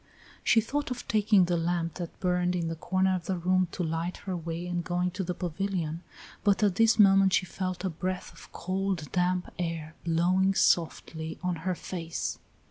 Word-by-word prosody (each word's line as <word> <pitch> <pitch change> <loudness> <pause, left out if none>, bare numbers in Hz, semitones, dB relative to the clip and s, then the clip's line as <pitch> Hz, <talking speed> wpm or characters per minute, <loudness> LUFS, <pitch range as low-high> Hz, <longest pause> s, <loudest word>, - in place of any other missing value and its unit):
She 225 - +5
thought 285 +6 -2
of 250 -1 -5
taking 210 -3 +4
the 175 0 0
lamp 170 -1 -1
that 170 -2 -6
burned 180 -1 +1
in 170 -2 -1
the 165 - -3
corner 185 +3 +1
of 180 -2 -3
the 190 - 0
room 185 +1 +2
to 180 - -2
light 165 +2 -2
her 190 -2 -2
way 170 0 -4
and 175 -1 -2
going 180 +1 0
to 190 +2 -3
the 180 0 -3
pavilion, 175 -2 -2 0.4
but 205 0 +3
at 205 -3 +4
this 225 +4 +4
moment 195 -2 +6
she 185 - +3
felt 185 0 -4
a - - +1
breath 180 +3 -4
of - - -15
cold 185 -3 -2
damp 180 0 0
air 165 -2 -3
blowing 180 +3 +2
softly 160 -2 +1
on 180 -1 0
her 185 - +1
face. 165 -2 -4
180 Hz, 190 wpm, -29 LUFS, 170-190 Hz, 0.4 s, moment